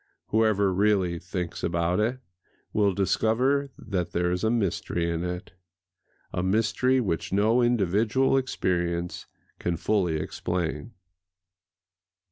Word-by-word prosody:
Whoever 105 -3 +3
really 95 -3 +2
thinks 90 0 -5
about 85 +2 0
it 120 +4 +1 0.6
will 105 -2 +3
discover 125 +8 +1
that 95 -5 -3
there 90 0 +1
is 90 +3 -2
a 110 - +3
mystery 95 -6 0
in 85 0 -2
it,—a 90 0 -8
mystery 115 +7 +2
which 95 -9 -2
no 110 +5 +3
individual 115 +3 +2
experience 85 -9 -1 0.3
can 85 -1 -1
fully 90 -3 +1
explain. 90 +7 -3
95 Hz, 105 wpm, -26 LUFS, 90-110 Hz, 0.6 s, Whoever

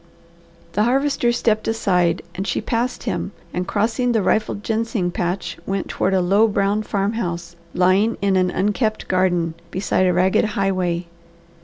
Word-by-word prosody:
The 210 - 0
Harvester 270 -1 +2
stepped 220 -3 0
aside 180 -6 +1
and 190 +2 -4
she - - 0
passed 235 +3 -2
him - - -3 0.2
and 180 +1 -2
crossing 225 +5 +1
the 220 -3 +2
rifled 215 0 0
ginseng 220 -5 -1
patch 175 0 -3
went 195 -1 -2
toward 190 - 0
a 185 - +3
low 200 +5 +4
brown 205 0 +1
farmhouse 195 -5 -2 0.2
lying 190 +5 +3
in 200 -1 +1
an 185 -1 +3
unkept 210 +4 -1
garden, 180 -3 +1 0.2
beside 185 0 +1
a 180 - +3
ragged 185 +4 +3
highway. 185 -3 0
195 Hz, 150 wpm, -21 LUFS, 180-220 Hz, 0.2 s, low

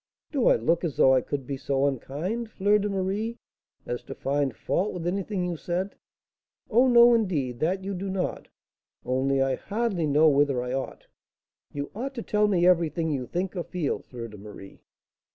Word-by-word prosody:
"Do 275 -5 +1
I - - +6
look 160 +11 +1
as 160 -5 -3
though 130 - +6
I 130 - +4
could 135 +1 -4
be 140 +1 -4
so 135 0 0
unkind, 160 - -3
Fleur 205 0 +2
de 205 +1 -1
Marie, 200 +4 -2 0.5
as 120 - -3
to - - -7
find 140 -3 -1
fault 200 +4 -1
with 170 -2 -5
anything 195 +1 -1
you 175 -1 -2
said?" 180 +4 -3 0.8
"Oh, 245 +4 +5
no, 240 -1 +7
indeed, 150 - 0
that 185 +4 0
you 200 +1 -3
do 195 +1 -4
not; 190 -1 -3 0.6
only 135 +1 +1
I 135 0 +1
hardly 205 - -1
know 150 +2 +5
whether 140 -3 +3
I 125 0 -4
ought 135 0 -4 0.3
" - - -57
"You 140 0 -4
ought 265 +6 -5
to 235 - -4
tell 210 0 +2
me 180 -4 +2
everything 165 -2 +2
you 130 -4 -2
think 180 +2 -3
or 175 - -2
feel, 170 -5 -2
Fleur 120 -2 -8
de 105 -2 -12
Marie." 100 -1 -12
170 Hz, 190 wpm, -26 LUFS, 135-200 Hz, 0.8 s, no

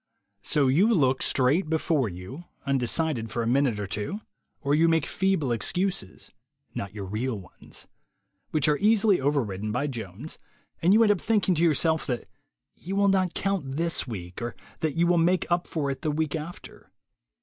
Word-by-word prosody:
wSo 145 -2 +2
you 200 +10 +4
look 135 - +3
straight 145 +7 +2
before 155 -6 +1
you, 95 - -9 0.2
undecided 135 -1 0
for 115 +3 -2
a - - -2
minute 125 -3 +2
or 105 - -2
two, 105 - -3 0.4
or 140 0 +1
you 160 +3 +4
make 165 -2 +2
feeble 190 -9 0
excuses 175 - -2 0.4
(not 100 - -4
your 100 -1 -6
real 110 +6 -2
ones) 90 - -10 0.6
which 155 -2 +1
are 150 -1 +2
easily 210 -4 +4
overridden 110 -8 -1
by 125 +6 0
Jones, 120 - -6 0.4
and 175 - +4
you 220 +3 +6
end 210 -2 +5
by 180 - -10
thinking 210 -4 +2
to 165 - 0
yourself 160 0 +2
that 125 -3 -3 0.5
you 190 +3 -6
will 200 0 +4
not 185 -2 +1
count 175 -9 -1
this 165 -3 0
week, 90 -5 -7
or 120 0 -4 0.2
that 155 -3 -1
you 170 +1 +3
will 175 0 +3
make 175 +2 +2
up 175 0 +1
for 145 -4 -1
it 135 - -6
the 155 - -1
week 155 +1 -1
after 160 +3 -8
150 Hz, 180 wpm, -26 LUFS, 120-175 Hz, 0.6 s, you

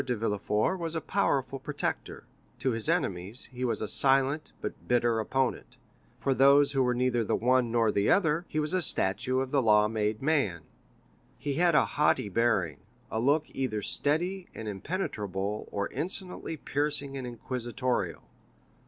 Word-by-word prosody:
de 125 -1 -1
Villefort 105 - 0
was 165 -1 -4
a - - +1
powerful 135 -8 0
protector; 145 +2 -4 0.3
to 130 - 0
his 115 -2 -2
enemies, 95 +6 -1
he 125 0 -5
was 120 -3 0
a - - -2
silent, 135 +6 +2
but - - -7
bitter 120 -2 +2
opponent; 130 +4 -1 0.4
for 135 - +1
those 140 +2 +5
who 135 -2 +1
were 125 -1 +2
neither 125 -1 +1
the - - 0
one 125 0 +2
nor 115 -2 +3
the 100 0 +1
other, 165 -3 +3
he - - -5
was 155 +2 0
a 185 - +2
statue 130 - +1
of 130 -1 -4
the 140 - +3
law 105 -2 +5
made 105 -1 -1
man. 135 - 0 0.7
He 145 +2 -3
had 170 +2 +3
a - - +5
haughty 145 -7 +1
bearing, 100 - +1 0.3
a 110 - -1
look 145 +6 +2
either 110 -6 -2
steady 175 - 0
and 110 - -6
impenetrable 105 - -3
or 100 0 -1
insolently 175 +1 -4
piercing 145 -1 -2
and 130 -2 -4
inquisitorial. 125 +1 -3
130 Hz, 160 wpm, -29 LUFS, 110-145 Hz, 0.7 s, those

